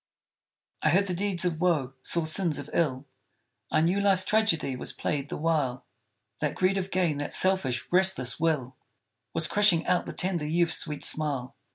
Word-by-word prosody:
I - - +2
heard 195 +3 +3
the 185 - -3
deeds 185 -1 0
of 165 -2 -1
woe 150 -8 +1
saw 170 +3 +2
sins 160 -1 +1
of 145 0 -7
ill; 140 -5 0 0.6
I - - +2
knew 175 +5 +2
Life's 195 -2 +3
tragedy 210 -11 +1
was 125 - -5
played 145 -1 -3
the - - -4
while; 150 -6 -1 0.5
That - - -2
greed 190 +1 +1
of 190 0 -4
gain 175 -6 0
that 145 - -2
selfish, 185 -10 +2
restless 180 -10 +2
will 150 -6 -1 0.6
Was 165 0 +3
crushing 205 -5 +3
out 180 0 +1
the - - -5
tender 175 -5 -1
youth's 170 +1 +1
sweet 150 -3 -5
smile. 140 -5 -2
165 Hz, 175 wpm, -27 LUFS, 145-185 Hz, 0.6 s, heard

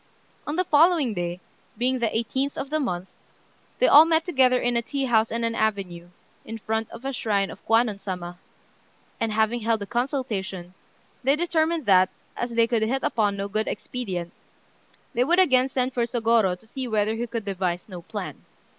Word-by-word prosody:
On 295 - -2
the 365 - +2
following 310 -6 +4
day, 175 -1 -4 0.4
being 255 +2 +1
the 235 - +1
18th 260 +6 -2
of 275 - -5
the 310 - +1
month, 185 -9 -3 0.7
they - - +4
all 300 - +9
met 320 0 +2
together 260 -7 +3
at 245 0 0
a 235 - +2
tea 275 +3 -3
house 225 -3 +3
in 230 +1 -2
an 230 0 0
avenue, 195 -6 -2 0.4
in 225 - -7
front 220 +1 -2
of 250 - -11
a 275 - -2
shrine 205 -5 0
of - - -13
Kwannon 225 -2 +2
Sama; 180 -3 -6 0.8
and 225 -2 0
having 220 +2 +1
held 225 0 0
a - - -5
consultation, 215 - -3 0.5
they 270 +3 +4
determined 325 -2 0
that, 185 -2 +5 0.3
as 240 - -3
they 230 -1 +3
could 230 -1 0
hit 255 +5 0
upon 205 -3 +1
no 200 0 -3
good 215 +2 -2
expedient, 190 -7 -4 0.8
they 245 - +2
would 340 +7 +2
again 265 -8 +4
send 255 0 -1
for 245 - -1
Sôgorô 225 -6 +2
to - - -20
see 255 +3 -5
whether 215 -1 +1
he 235 +2 -3
could 230 -2 -4
devise 185 -3 -2
no 180 -4 -8
plan. - - -7
230 Hz, 190 wpm, -25 LUFS, 200-260 Hz, 0.8 s, all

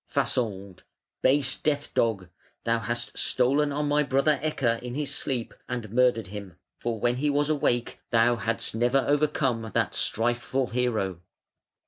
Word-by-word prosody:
Fasold: 100 -6 -1 0.4
"Base 135 -1 +3
death 145 -1 -1
dog! 105 -6 +1 0.4
thou 115 0 +1
hast 120 +1 -4
stolen 140 +4 +2
on 150 +1 -1
my 145 +1 +3
brother 140 +1 +2
Ecke 130 -7 0
in 125 0 -6
his 150 -1 -1
sleep 125 -4 -2 0.2
and 120 -4 -4
murdered 120 -4 +2
him; 100 -4 -8 0.2
for 115 -2 -3
when 120 +2 +1
he 145 +3 +1
was 145 +1 +1
awake 120 -5 0
thou 120 +1 +4
hadst 115 +1 -1
never 120 +4 +2
overcome 135 -6 +1
that - - +2
strifeful 120 +3 0
hero". 110 -7 -1
120 Hz, 145 wpm, -27 LUFS, 115-140 Hz, 0.4 s, thou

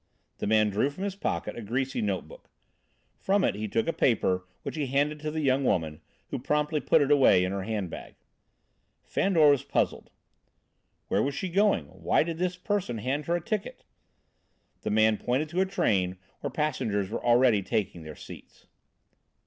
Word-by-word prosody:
The - - -2
man 110 0 +3
drew 110 +8 +1
from 155 +7 -7
his 200 -1 -2
pocket 200 - -3
a 120 - -6
greasy 130 +5 -2
note 100 -4 -2
book. - - -15 0.7
From 195 0 +1
it - - +2
he 110 +2 -4
took 115 +2 -1
a 165 - +1
paper 95 -6 +1 0.2
which - - -4
he 150 -3 -2
handed 145 +3 0
to 155 0 -3
the 155 +1 -3
young 135 -1 +2
woman, 80 -10 0 0.3
who - - -3
promptly 150 +4 0
put 145 - +3
it 140 - 0
away 130 -10 +5
in 95 - -1
her 100 0 -2
handbag. 100 -4 -5 0.9
Fandor 165 -7 +3
was 140 -1 +1
puzzled. - - -1 1.0
"Where - - +1
was 140 0 -1
she 185 - -3
going? 195 - +2
Why 85 - 0
did 165 0 -5
this 180 0 -1
person 180 - -2
hand 135 +6 -2
her 170 - +2
a 175 - -2
ticket?" 215 +3 -4 1.0
The - - -3
man 110 0 +3
pointed 130 +8 -1
to 175 +4 0
a 190 - +1
train 95 - 0 0.2
where 145 - -3
passengers 110 -9 -1
were - - -4
already 120 -3 +4
taking 100 -4 -2
their 80 -1 -9
seats. - - -13
130 Hz, 180 wpm, -28 LUFS, 105-155 Hz, 1.0 s, away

